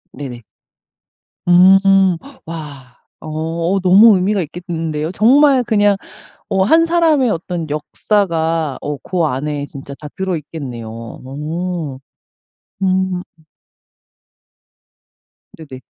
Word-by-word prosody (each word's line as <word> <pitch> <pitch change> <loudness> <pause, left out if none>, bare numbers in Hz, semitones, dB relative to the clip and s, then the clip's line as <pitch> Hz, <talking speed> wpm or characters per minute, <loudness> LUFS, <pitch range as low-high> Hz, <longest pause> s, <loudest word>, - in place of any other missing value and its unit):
네네. 125 -5 -8 1.0
음 190 0 +5 0.3
와 145 -6 -9 0.3
어 165 +4 -2
너무 195 +4 +6
의미가 195 +2 +1
있겠는데요. 165 -2 -4
정말 265 +4 +4
그냥 205 -3 +3 0.5
어 190 -1 +2
1 325 +10 +4
사람의 325 -7 +2
어떤 170 -3 -3
역사가 160 -2 -1
어 145 0 -4
그 180 -3 -1
안에 145 +1 -2
진짜 140 0 -10
다 150 - -8
들어 190 -3 -2
있겠네요. 120 -7 -8 1.6
음. 185 -1 0 2.4
네네. 135 -5 -11
170 Hz, 165 characters per minute, -17 LUFS, 150-195 Hz, 2.4 s, 너무